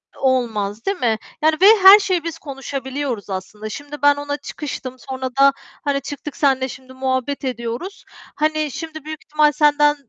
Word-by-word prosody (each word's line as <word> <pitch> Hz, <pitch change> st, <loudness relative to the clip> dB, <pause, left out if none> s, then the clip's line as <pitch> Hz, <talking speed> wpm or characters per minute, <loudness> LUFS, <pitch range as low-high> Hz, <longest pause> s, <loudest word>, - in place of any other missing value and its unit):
Olmaz, 225 Hz, -5 st, -1 dB
değil 395 Hz, -1 st, 0 dB
mi? 225 Hz, -3 st, +1 dB, 0.2 s
Yani, 310 Hz, 0 st, +4 dB
ve -, -, +7 dB, 0.2 s
her 390 Hz, +2 st, +10 dB
şeyi 370 Hz, -5 st, 0 dB
biz 330 Hz, -1 st, -5 dB
konuşabiliyoruz 270 Hz, -4 st, -5 dB
aslında. 200 Hz, +3 st, -6 dB
Şimdi 290 Hz, +5 st, -8 dB
ben 290 Hz, 0 st, +5 dB
ona 290 Hz, 0 st, -4 dB
çıkıştım, 265 Hz, -5 st, -6 dB
sonra 260 Hz, 0 st, -3 dB
da, 275 Hz, 0 st, +7 dB, 0.3 s
hani, 280 Hz, -1 st, 0 dB
çıktık 290 Hz, +1 st, -7 dB
senle 265 Hz, -2 st, +2 dB
şimdi 260 Hz, +1 st, -11 dB
muhabbet 260 Hz, +1 st, -2 dB
ediyoruz. 245 Hz, -, -5 dB, 0.3 s
Hani, 310 Hz, -1 st, 0 dB
şimdi 315 Hz, +1 st, -7 dB
büyük 310 Hz, +3 st, -7 dB
ihtimal 300 Hz, -3 st, +3 dB
senden 295 Hz, -1 st, +4 dB
285 Hz, 160 wpm, -20 LUFS, 260-305 Hz, 0.3 s, her